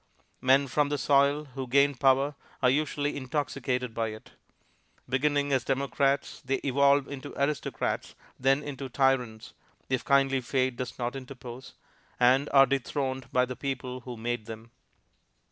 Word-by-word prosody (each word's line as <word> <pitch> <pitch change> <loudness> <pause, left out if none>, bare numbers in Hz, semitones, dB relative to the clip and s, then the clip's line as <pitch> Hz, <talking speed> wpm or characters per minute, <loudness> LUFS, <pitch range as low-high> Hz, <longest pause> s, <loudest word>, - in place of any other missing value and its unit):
Men 135 +2 +4
from 145 +2 +1
the 145 - -1
soil 140 +2 +3
who 130 0 -5
gain 140 +3 +4
power 135 +2 +3 0.3
are 125 - +5
usually 145 0 -1
intoxicated 130 -3 -2
by 115 0 -1
it; 110 0 -9 0.8
beginning 145 +2 +1
as 130 -3 +2
democrats 140 +1 0
they 135 +1 0
evolve 140 +1 +3
into 140 0 -8
aristocrats, 140 +1 -2 0.2
then 135 +3 +2
into 140 -2 -6
tyrants, 125 -4 0 0.4
if 130 -2 0
kindly 135 -1 +3
Fate 130 0 0
does 125 0 -5
not 120 +1 -3
interpose, 130 -1 -9 0.4
and 130 +3 +4
are 135 -1 +7
dethroned 135 0 -2
by 125 0 +3
the 125 0 -6
people 130 -2 -4
who 125 -1 -8
made 120 -1 -3
them. 115 +1 -9
135 Hz, 145 wpm, -28 LUFS, 125-140 Hz, 0.8 s, are